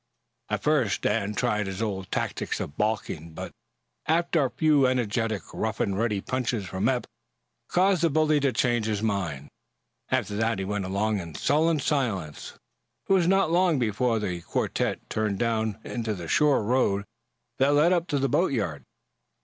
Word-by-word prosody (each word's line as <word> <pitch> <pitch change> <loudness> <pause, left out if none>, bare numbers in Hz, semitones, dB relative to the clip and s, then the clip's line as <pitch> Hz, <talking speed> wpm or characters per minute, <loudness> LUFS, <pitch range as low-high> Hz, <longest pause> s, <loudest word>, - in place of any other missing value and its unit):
At - - -2
first, 140 -10 +2
Dan 105 -1 0
tried 105 -4 0
his 95 0 -5
old 100 -4 -3
tactics - - -2
of 70 - -5
balking, 90 -7 -2
but - - -6 0.6
a 165 -3 +2
few 150 -3 +3
energetic, 115 -5 0
rough - - -2
and 100 - 0
ready 105 -2 0
punches 125 -4 -2
from 95 +4 -1
Eph 125 -2 0 0.6
caused 185 -1 +2
the 165 - +3
bully 155 0 +3
to 140 -1 +2
change 120 -1 +1
his 105 -1 -1
mind. 85 -10 -2 0.6
After 100 - 0
that 110 0 +1
he 95 - -3
went 100 -1 -2
along 100 +2 0
in 85 -4 -8
sullen 160 +1 +2
silence. 110 - -2 0.5
It - - +3
was 180 -3 +3
not 195 -3 +3
long 175 -2 +3
before 115 0 +1
the 90 -5 -3
quartette - - -2
turned 105 -2 -1
down 110 -2 0
into 115 -3 -3
the 85 -3 -7
shore 145 - +3
road 105 -4 +1 0.5
that 140 +2 +4
led 160 +5 +5
up 175 -1 0
to 145 - 0
the 135 0 +1
boatyard. 110 - 0
115 Hz, 165 wpm, -26 LUFS, 100-145 Hz, 0.6 s, led